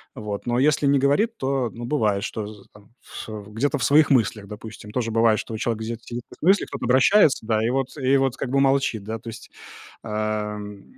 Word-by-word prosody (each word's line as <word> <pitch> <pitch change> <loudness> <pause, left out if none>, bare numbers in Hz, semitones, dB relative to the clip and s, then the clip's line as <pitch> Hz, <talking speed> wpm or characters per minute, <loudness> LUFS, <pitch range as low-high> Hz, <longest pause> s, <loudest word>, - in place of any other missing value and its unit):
Вот, 105 -1 -5
но 120 0 0
если 145 +1 +3
не 140 0 +4
говорит, 205 - +1
то, 130 -2 -1
ну, 120 +1 -7
бывает, 110 -7 0
что 110 -2 -4
з 105 -2 -13
там 105 -1 -18
в, - - -9
э, 105 -1 -7
где-то 140 +7 0
в 125 - -3
своих 145 +5 +5
мыслях, 110 -5 +2
допустим, 105 0 -10
тоже 115 0 -2
бывает, 115 -1 +3
что 110 - -6
человек 110 0 -2
где-то 115 +1 -5
сидит 120 0 -6
в - - -13
своих 170 - +1
мыслях, - - -6
кто-то - - -5
обращается, 135 - +4
да, 110 0 +1
и - - +1
вот 135 +3 -2
и 135 0 +3
вот 135 -2 +1
как 130 - -4
бы 135 +2 +2
молчит, 135 -5 +1
да, 110 +2 -5
то 115 - -9
есть, 115 0 -11 0.5
ам, 105 -2 -4
115 Hz, 225 wpm, -23 LUFS, 110-135 Hz, 0.5 s, своих